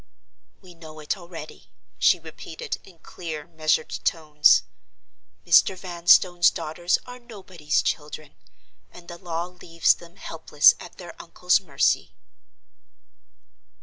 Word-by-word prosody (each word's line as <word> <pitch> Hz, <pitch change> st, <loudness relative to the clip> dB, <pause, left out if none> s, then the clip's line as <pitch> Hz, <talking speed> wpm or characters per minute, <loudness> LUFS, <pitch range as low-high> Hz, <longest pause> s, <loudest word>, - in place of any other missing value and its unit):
"We 185 Hz, -2 st, -15 dB
know 160 Hz, -2 st, -13 dB
it 150 Hz, -, -3 dB
already," 170 Hz, -4 st, -12 dB, 0.3 s
she -, -, +4 dB
repeated, 475 Hz, -3 st, -8 dB
in 185 Hz, -3 st, -18 dB
clear, 160 Hz, -4 st, -7 dB
measured 155 Hz, -2 st, -1 dB
tones. 150 Hz, -3 st, +3 dB, 0.8 s
"Mr. 190 Hz, -, +4 dB
Vanstone's 175 Hz, -1 st, +4 dB
daughters 175 Hz, +3 st, -2 dB
are 250 Hz, 0 st, -11 dB
Nobody's 185 Hz, -10 st, -3 dB
Children; 150 Hz, -1 st, -5 dB, 0.6 s
and 175 Hz, -1 st, -15 dB
the 170 Hz, 0 st, -10 dB
law 170 Hz, -1 st, -4 dB
leaves 175 Hz, -2 st, 0 dB
them 170 Hz, +1 st, -16 dB
helpless 160 Hz, -5 st, +3 dB
at 175 Hz, -, -12 dB
their 175 Hz, -2 st, -10 dB
uncle's 180 Hz, +2 st, +1 dB
mercy." 140 Hz, -8 st, 0 dB
170 Hz, 115 wpm, -24 LUFS, 155-180 Hz, 0.8 s, she